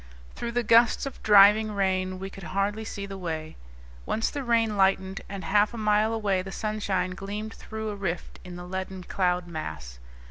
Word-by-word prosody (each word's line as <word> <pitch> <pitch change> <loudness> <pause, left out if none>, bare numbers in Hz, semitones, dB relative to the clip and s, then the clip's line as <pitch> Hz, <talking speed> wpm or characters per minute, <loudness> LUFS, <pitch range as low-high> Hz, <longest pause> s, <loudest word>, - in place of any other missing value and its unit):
Through 235 0 -5
the 245 0 +1
gusts 230 +3 +5
of 275 - -7
driving 210 +1 +6
rain 185 -2 0
we 195 +1 -6
could 195 - -11 0.2
hardly 205 +2 0
see 200 -2 -5
the 195 -1 -7
way. 160 -3 -4 0.5
Once 225 - -1
the 285 - -4
rain 230 -3 +2
lightened, 190 -1 +2
and 195 -1 -6
half 210 +2 +2
a - - -6
mile 215 0 +2
away 205 -4 0
the 195 +1 -8
sunshine 200 -3 -1
gleamed 205 +4 -5
through 220 -1 -6
a 210 - -4
rift 190 -4 -4
in 180 -1 -9
the 175 0 -8
leaden 190 0 -5
cloud 180 -1 0
mass. 80 - -7
200 Hz, 185 wpm, -27 LUFS, 185-215 Hz, 0.5 s, driving